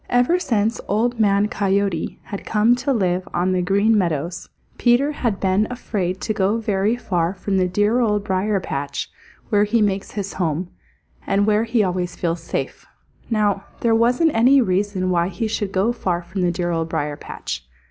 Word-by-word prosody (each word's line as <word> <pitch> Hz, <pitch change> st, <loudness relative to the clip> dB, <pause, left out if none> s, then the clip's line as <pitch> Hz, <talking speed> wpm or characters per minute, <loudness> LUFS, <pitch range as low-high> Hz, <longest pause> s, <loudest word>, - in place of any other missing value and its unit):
Ever 245 Hz, +9 st, +3 dB
since 225 Hz, -, 0 dB
Old 230 Hz, +3 st, 0 dB
Man 200 Hz, -1 st, +3 dB
Coyote 195 Hz, -4 st, -1 dB
had 200 Hz, -, -7 dB
come 220 Hz, +2 st, +3 dB
to 265 Hz, +3 st, -1 dB
live 185 Hz, -6 st, 0 dB
on 180 Hz, +2 st, +1 dB
the 185 Hz, -1 st, +1 dB
Green 200 Hz, +5 st, +3 dB
Meadows, 170 Hz, -3 st, -1 dB, 0.3 s
Peter 245 Hz, +4 st, +3 dB
had 235 Hz, -8 st, -2 dB
been 195 Hz, +2 st, +2 dB
afraid 195 Hz, -7 st, -3 dB
to 215 Hz, -, -1 dB
go 200 Hz, +2 st, +1 dB
very 210 Hz, 0 st, 0 dB
far 180 Hz, -6 st, -1 dB
from 195 Hz, +1 st, -1 dB
the 185 Hz, -1 st, +2 dB
dear 205 Hz, +6 st, +2 dB
Old 210 Hz, -4 st, +1 dB
Briar 195 Hz, +1 st, 0 dB
patch 140 Hz, -5 st, -4 dB, 0.4 s
where 205 Hz, -1 st, +3 dB
he 215 Hz, +3 st, +1 dB
makes 200 Hz, -2 st, 0 dB
his 200 Hz, -1 st, -4 dB
home, 175 Hz, 0 st, -2 dB, 0.6 s
and 200 Hz, +1 st, +2 dB
where 215 Hz, +1 st, +2 dB
he 230 Hz, -1 st, +2 dB
always 180 Hz, -1 st, -2 dB
feels 170 Hz, -1 st, -2 dB
safe. -, -, -4 dB, 0.4 s
Now 205 Hz, -3 st, +1 dB, 0.2 s
there 230 Hz, -1 st, +3 dB
wasn't 245 Hz, +8 st, +3 dB
any 250 Hz, +5 st, +5 dB
reason 190 Hz, -3 st, 0 dB
why 170 Hz, -1 st, +2 dB
he 225 Hz, +4 st, -3 dB
should 210 Hz, -2 st, -2 dB
go 195 Hz, +6 st, +1 dB
far 180 Hz, -7 st, -2 dB
from 185 Hz, +2 st, -4 dB
the 175 Hz, -1 st, +2 dB
dear 175 Hz, 0 st, -2 dB
Old 165 Hz, -1 st, -1 dB
Briar 145 Hz, -2 st, -2 dB
patch. 145 Hz, -, -6 dB
200 Hz, 180 wpm, -21 LUFS, 180-225 Hz, 0.6 s, any